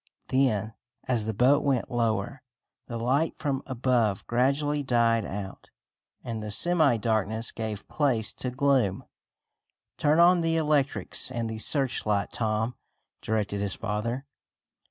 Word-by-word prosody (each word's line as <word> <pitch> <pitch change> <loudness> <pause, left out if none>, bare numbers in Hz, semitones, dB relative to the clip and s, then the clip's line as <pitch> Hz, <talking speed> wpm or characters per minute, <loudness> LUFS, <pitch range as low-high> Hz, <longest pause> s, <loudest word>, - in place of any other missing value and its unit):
Then, 115 -5 +1 0.3
as 120 -4 0
the 110 - -1
boat 130 +6 +4
went 135 -4 0
lower, 120 +3 -1 0.5
the 115 - -5
light 135 +7 0
from 140 -3 -2
above 120 -5 0
gradually 140 +4 +1
died 115 -4 +2
out, 100 0 -7 0.5
and 115 -2 -4
the 105 - -5
semi 155 - +3
darkness 110 0 0
gave 110 -2 -5
place 120 -8 0
to 125 - -4
gloom. 125 -6 +1 1.0
"Turn 150 +1 +3
on 175 +1 +6
the 165 0 +1
electrics 150 -5 +1
and 120 -3 -3
the 110 0 -5
searchlight, 110 -6 +1
Tom," 110 +1 -1 0.5
directed 105 -2 -1
his 100 -2 -2
father. 115 +6 -3
120 Hz, 130 wpm, -27 LUFS, 110-140 Hz, 1.0 s, on